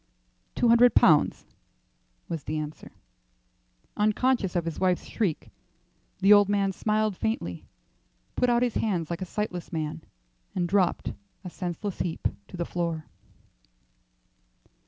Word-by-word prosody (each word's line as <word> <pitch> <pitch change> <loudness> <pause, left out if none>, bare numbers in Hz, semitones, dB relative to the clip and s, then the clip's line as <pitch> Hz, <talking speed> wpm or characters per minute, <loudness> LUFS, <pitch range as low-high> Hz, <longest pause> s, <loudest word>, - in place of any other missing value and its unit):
"Two 240 - +2
hundred 235 0 +6
pounds," 155 -3 +4 0.8
was 165 -4 -4
the 155 - -2
answer. 150 0 -6 1.0
Unconscious 215 -1 +1
of 170 -1 0
his 165 - -4
wife's 185 -1 +1
shriek, 190 -9 -2 0.7
the 195 +2 +7
old 205 -1 +6
man 200 -1 +2
smiled 215 +1 0
faintly, 225 +7 -3 0.7
put 250 - +2
out 240 0 +3
his 245 -3 0
hands 175 -7 -1
like 170 +2 -4
a - - -2
sightless 180 -2 -4
man, 160 -1 -3 0.5
and 175 -1 0
dropped, 185 -1 +1 0.3
a 180 - -7
senseless 180 +3 -5
heap, 170 -3 -1 0.2
to - - -9
the 170 - -2
floor. 165 -3 -3
185 Hz, 130 wpm, -27 LUFS, 170-215 Hz, 1.0 s, the